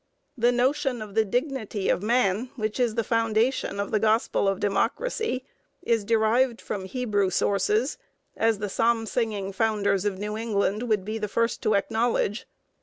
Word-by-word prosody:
The 240 -1 +3
notion 250 +1 +1
of 215 -2 -8
the 220 +1 +3
dignity 230 -3 -2
of - - +2
man, 225 0 +1
which 215 -1 -3
is 240 -3 +1
the 230 - +1
foundation 230 0 0
of 200 - -2
the 215 - +2
gospel 220 -1 +2
of 195 -1 0
democracy, 260 - -1 0.4
is 230 -6 +1
derived 230 +3 +2
from 195 -2 -5
Hebrew 205 -3 0
sources, 205 +7 +1 0.4
as 225 -1 +2
the 205 +1 -3
Psalm 225 +3 +1
singing 215 -4 -2
founders 200 -2 +1
of 205 -2 -1
New 210 +2 -4
England 220 +1 -1
would 210 -4 +1
be 220 +2 -3
the 210 - -2
first 230 +3 0
to 215 - +2
acknowledge. 220 +2 0
220 Hz, 165 wpm, -26 LUFS, 205-235 Hz, 0.4 s, The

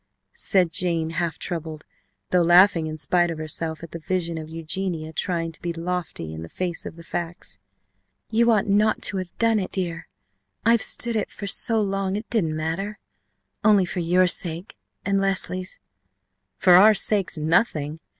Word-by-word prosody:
said 180 -4 +2
Jane, 165 -2 +1
half 165 0 -2
troubled, 160 -3 -5 0.5
though 180 - +4
laughing 175 -1 +5
in 155 0 -5
spite 175 +2 +2
of 165 - -4
herself 160 +1 -3
at 165 - -9
the 170 - -6
vision 170 -1 -2
of 155 0 -8
Eugenia 165 0 -4
trying 165 0 -2
to 160 - -12
be 175 - -2
lofty 170 - -4
in 80 - -7
the 80 - -8
face 175 -2 -4
of - - -9
the 170 - -12
facts. 170 0 -5 0.7
"You 235 +1 +3
ought 215 -4 +3
not 210 +2 +2
to 200 - +4
have 185 -2 -6
done 230 -1 +3
it, 190 - -4
dear. 175 -3 -4 0.6
I 230 - +5
have 230 -1 +3
stood 235 -1 +2
it 215 - -1
so 220 +2 0
long, 195 -1 -1
it 215 +2 -5
didn't 165 -9 0
matter! 185 +7 -3 0.7
Only 205 -3 +5
for 180 - -4
your 175 +2 +3
sake 175 +1 0 0.3
and 195 -1 +1
Leslie's 185 -1 -2 0.4
!" - - -52 0.3
"For 180 - +5
our 210 +4 +8
sakes, 200 -4 +2
nothing!" 155 -1 0
175 Hz, 175 wpm, -24 LUFS, 165-195 Hz, 0.7 s, our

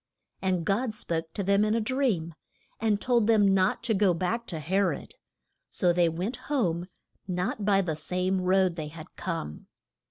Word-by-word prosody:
And 185 -3 0
God 215 +4 0
spoke 165 -5 -3
to 200 - -2
them 200 +2 +3
in 215 +1 +2
a - - +2
dream, 220 -9 0 0.5
and 215 -2 +1
told 240 -3 +2
them 205 -4 +5
not 190 +3 +2
to 230 -1 +2
go 195 -3 +3
back 225 +7 -2
to 165 - -4
He 185 +6 0
rod, 185 -7 -1 0.6
so 175 -1 +2
they 175 -1 +3
went 185 +10 -3
home 180 - 0 0.4
not 185 +3 -2
by 200 -1 +4
the 165 -5 -2
same 185 +4 -1
road 185 -1 +2
they 155 -2 -4
had 155 +2 -11
come. 165 - -5
190 Hz, 180 wpm, -28 LUFS, 170-210 Hz, 0.6 s, them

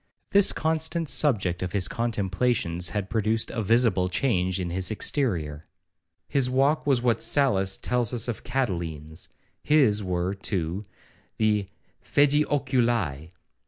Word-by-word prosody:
This 200 -1 +5
constant 160 +1 -1
subject 105 - +2
of 90 -1 -4
his 95 -3 +1
contemplations 100 -5 -1
had 95 +3 -3
produced 110 +1 -1
a 115 - -3
visible 105 -4 +2
change 95 -3 0
in 90 -2 -3
his 90 +1 +1
exterior,—his 90 - -3
walk 140 +4 +1
was 130 -4 +2
what 120 -2 +1
Sallust 100 -10 +2
tells 120 -2 0
us 120 -1 0
of 120 - -5
Catiline's,—his 105 - -1
were, 90 0 -2
too, 95 -1 -3 0.5
the 105 -3 +1 0.4
'fædi 145 +1 +3
oculi.' 120 - 0
105 Hz, 120 wpm, -25 LUFS, 90-125 Hz, 0.5 s, This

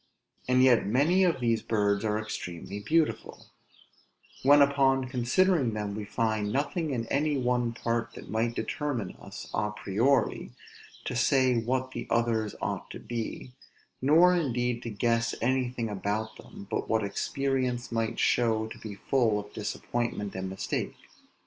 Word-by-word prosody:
and 125 0 +4
yet 120 -6 +5
many 150 - +3
of 170 -7 +2
these 115 -2 +1
birds 100 -2 +1
are 105 -1 +1
extremely 100 -2 -5
beautiful; 155 +9 0 1.0
when 145 +2 +6
upon 135 -2 +3
considering 130 - +2
them 105 -1 -3
we 105 +1 -4
find 110 -1 -1
nothing 150 - -1
in 120 -4 -2
any 145 +1 +1
one 125 -2 +1
part 115 0 -2
that - - -10
might 115 +3 -1
determine 130 -10 -3
us, - - -9
à 105 0 -1
priori, 115 +7 +1 0.5
to - - -3
say 130 +1 +3
what 130 +3 -1
the - - -6
others 115 -2 +1
ought - - -3
to - - -8
be, 120 +1 -5 0.5
nor 165 +7 +6
indeed 125 -7 0
to 120 - -5
guess 115 +2 0
anything 125 -1 0
about 105 +2 -3
them, 100 - -12
but - - -2
what 110 -1 +2
experience 130 +3 -1
might 115 0 -1
show 110 -2 +2
to 110 - -9
be 105 -2 -7
full 115 -3 +1
of 105 0 -9
disappointment 110 -1 -3
and 95 0 -4
mistake. 95 -1 -3
120 Hz, 150 wpm, -28 LUFS, 110-130 Hz, 1.0 s, when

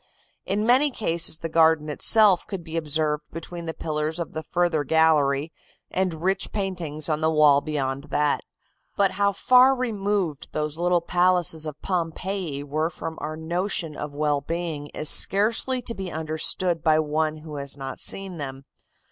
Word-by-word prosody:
In 210 +2 0
many 260 +5 +4
cases 170 - +1
the 165 - -5
garden 160 -1 +3
itself 195 +5 +4
could 195 -4 -6
be 160 0 -8
observed 155 -1 -1
between 170 +1 -8
the 160 - -3
pillars 155 +1 -3
of 170 - -5
the 160 - -4
further 170 -2 0
gallery, 155 -1 +2 0.4
and 180 -4 -2
rich 190 +1 0
paintings 175 -7 -4
on 155 -1 -1
the 160 - +2
wall 150 -3 +5
beyond 140 -2 -3
that. 150 0 0 0.6
"But 195 -1 +3
how 200 0 +1
far 255 +6 +5
removed 205 - -2
those 150 +1 -3
little 175 0 +2
palaces 175 -2 +2
of 150 0 -7
Pompeii 175 -3 -3
were 155 +3 -1
from 165 -1 -7
our 155 +1 -5
notion 170 0 -1
of 150 0 -6
well 145 0 0
being 165 -1 -4
is 155 - -4
scarcely 230 - +4
to 230 - -3
be 190 -4 -6
understood 160 +2 -2
by 155 -1 +3
one 155 0 -1
who 155 -1 -9
has 140 0 -1
not 135 -1 -6
seen 195 -3 -2
them. 135 -1 -7
160 Hz, 165 wpm, -24 LUFS, 150-185 Hz, 0.6 s, wall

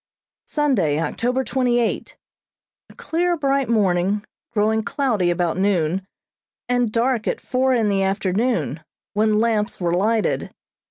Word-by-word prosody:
Sunday, 215 - +1
October 245 - -1
twenty 250 -2 +1
eight: 235 - -2 0.7
A - - -17
clear, 345 +1 0
bright 275 -3 0
morning, 200 -2 +1 0.3
growing 220 0 +1
cloudy 220 - 0
about 175 -1 0
noon, 190 -2 +1 0.7
and 245 -2 +1
dark 235 0 0
at - - -1
four 260 0 +1
in 225 -3 +2
the 200 -1 +1
afternoon, 195 +5 0 0.3
when 215 0 +2
lamps 220 -1 0
were 170 -2 0
lighted. 215 +5 +1
220 Hz, 125 wpm, -22 LUFS, 195-250 Hz, 0.7 s, in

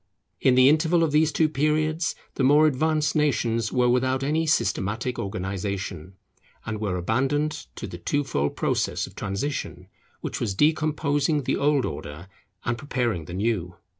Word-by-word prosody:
In 130 - +4
the 130 0 +7
interval 160 +3 +4
of 160 - +1
these 155 +1 +3
two 155 +2 +3
periods 155 +2 0 0.2
the - - -3
more 145 +4 +6
advanced 155 +1 +1
nations 115 -7 +1
were 125 -1 +2
without 130 +2 +1
any 160 +3 0
systematic 115 - 0
organization, 95 -2 -4 0.5
and 105 0 -4
were 95 -4 -1
abandoned 135 - -1
to - - -6
the 85 - -8
two 145 +11 0
fold 75 - -1
process - - 0
of - - -13
transition, 120 +10 -4 0.4
which - - -4
was 105 -5 -1
decomposing 150 0 +1
the - - 0
old 145 -2 +2
order 80 +6 -7 0.4
and 120 0 -1
preparing 120 - -2
the 85 - -7
new. 95 -4 -1
130 Hz, 155 wpm, -25 LUFS, 100-150 Hz, 0.5 s, the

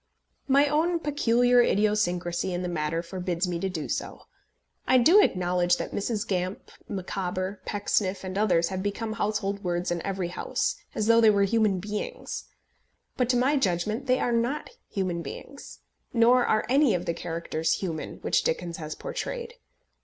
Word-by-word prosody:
My 280 +1 +5
own 320 +4 +2
peculiar 245 -5 +3
idiosyncrasy 190 -5 +1
in 180 - -3
the - - -2
matter 165 -1 -2
forbids 180 0 -2
me 175 -1 -2
to 195 - -1
do 165 -5 -4
so. - - -4 0.6
I 260 - +5
do 335 - +7
acknowledge 180 - +2
that - - -4
Mrs. 215 +2 -2
Gamp, 185 0 -3 0.2
Micawber, 185 0 -3
Pecksniff, 200 -2 -1
and 185 0 -5
others 185 -5 +2
have 190 -1 -3
become 210 +3 -3
household 205 -2 -2
words 175 0 -1
in 175 -1 -1
every 190 -3 -3
house, 180 - -1 0.2
as 215 - 0
though 230 +1 +5
they 220 - +7
were 200 -1 +4
human 210 -1 +2
beings; 205 +3 -5 0.7
but 250 -2 0
to 250 - +3
my 270 +4 +3
judgment 215 +3 -1
they 255 0 +3
are 245 - 0
not 240 - -1 0.2
human 185 -4 -2
beings, 280 +10 -9 0.3
nor 240 +1 +5
are 215 - +2
any 270 -2 +4
of 175 - -3
the 170 - 0
characters 165 -1 -2
human 165 -5 -4
which - - +2
Dickens 170 0 -2
has 155 -1 -6
portrayed. 475 -1 -5
200 Hz, 165 wpm, -27 LUFS, 175-235 Hz, 0.7 s, do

